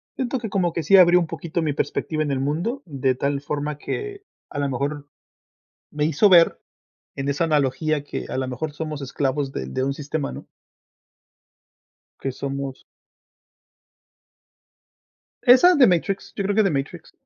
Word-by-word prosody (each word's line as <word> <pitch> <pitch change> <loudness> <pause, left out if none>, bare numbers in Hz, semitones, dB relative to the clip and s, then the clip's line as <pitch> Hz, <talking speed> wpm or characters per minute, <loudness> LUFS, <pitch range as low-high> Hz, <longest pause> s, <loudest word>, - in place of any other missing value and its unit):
siento 260 0 -2
que 225 -2 -5
como 180 -4 0
que 165 - -1
sí 175 +6 +5
abrió 180 -1 +7
un 170 - -1
poquito 170 +1 -4
mi 155 -2 0
perspectiva 155 +1 -2
en 145 - -2
el 135 - -1
mundo, 170 - -2
de 135 -3 0
tal 140 +2 -2
forma 145 0 -3
que 405 - -5 0.3
a - - -8
la 145 0 0
mejor 140 +2 -3 0.9
me 150 0 -1
hizo 160 +7 +4
ver, 170 -3 +5 0.5
en 135 0 -4
esa 140 +4 +1
analogía, 150 0 +1
que 145 - -6
a - - -3
la 130 -1 -2
mejor 145 +4 -4
somos 150 -1 -5
esclavos 135 +1 -2
de 65 - -4
de 100 - -2
un 135 +1 -1
sistema, 145 0 -4
¿no? - - -10 1.7
Que 135 - -3
somos 135 0 -5 2.6
Esa 260 +9 +8
de 270 -5 +6
Matrix, 185 +2 -1
yo 200 - -2
creo 200 +1 0
que 220 - +5
de 195 - +2
Matrix. 135 -1 -4
150 Hz, 165 wpm, -23 LUFS, 140-175 Hz, 2.6 s, Esa